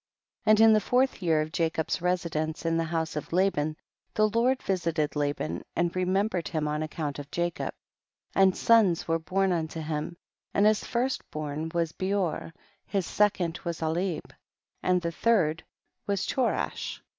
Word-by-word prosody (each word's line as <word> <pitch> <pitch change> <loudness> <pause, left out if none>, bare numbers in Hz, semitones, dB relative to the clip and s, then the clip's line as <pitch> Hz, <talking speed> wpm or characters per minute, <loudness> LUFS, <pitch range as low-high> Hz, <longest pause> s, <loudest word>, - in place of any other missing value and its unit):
18. - - +7
And 215 - +6
in 225 0 +8
the 215 - +4
fourth 250 +2 +1
year 160 -3 +3
of 155 +1 -4
Ja 165 -1 +3
cob's 160 0 -2
residence 170 -3 -1
in 165 0 +2
the 165 0 +1
house 160 -1 -2
of 150 - -5
La 190 +3 +3
ban, 155 -1 -2 0.4
the 215 0 +4
Lord 245 +4 +2
visited 165 -6 0
Laban 145 - -2
and 175 0 0
re 185 0 +1
membered 190 -2 0
him 155 -2 -1
on 150 +1 -1
account 155 -2 -3
of 145 0 -8
Jacob, 175 +1 -2 0.6
and 190 -1 +4
sons 215 -7 +4
were 165 0 +1
born 190 +3 +1
unto 165 -2 -2
him, 155 +2 -3 0.4
and 200 - +4
his 215 0 +4
first 255 +2 -1
born 155 +1 -4
was 165 -2 +1
Beor, 185 -3 -1 0.4
his 195 -3 -1
second 190 -5 +1
was 170 -2 -3
Alib, 165 +1 -1 0.5
and 180 -1 +2
the 170 - -1
third 165 -5 +2 0.4
was 200 -2 0
Cho 255 -3 +1
rash. - - -3
170 Hz, 175 wpm, -28 LUFS, 155-195 Hz, 0.6 s, in